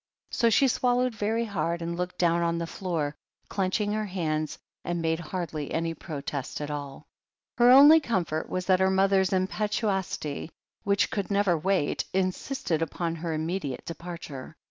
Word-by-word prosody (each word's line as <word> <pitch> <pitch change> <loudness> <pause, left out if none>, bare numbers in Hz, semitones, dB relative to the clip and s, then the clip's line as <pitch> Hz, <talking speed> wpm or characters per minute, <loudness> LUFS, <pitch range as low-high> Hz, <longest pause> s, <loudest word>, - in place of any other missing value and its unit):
'* - - -46
So 235 - +3
she 270 +5 +4
swallowed 250 0 +1
very 220 +2 0
hard, 170 -5 -1
and 170 0 -3
looked 180 +1 -4
down 170 -1 +2
on 170 0 +1
the 170 - -2
floor, 165 -5 -3 0.3
clenching 205 +2 0
her 215 0 -1
hands, 155 -4 -2 0.3
and 175 0 -2
made 160 0 0
hardly 160 -3 -4
any 165 0 -1
protest 145 -4 -5
at 150 0 -4
all. 145 0 -6 0.5
Her 240 +1 +7
only 290 +5 +9
comfort 175 - -2
was 185 0 -2
that 185 0 +4
her 190 0 +4
mother's 190 0 +3
impetuosity, 190 -5 -1 0.3
which 200 0 +2
could 200 -2 -2
never 200 -3 +3
wait, 180 -1 0
insisted 185 - -1
upon 165 +1 -2
her 165 +1 -3
immediate 155 -3 -3
departure. 165 -4 -7
180 Hz, 160 wpm, -27 LUFS, 160-200 Hz, 0.5 s, only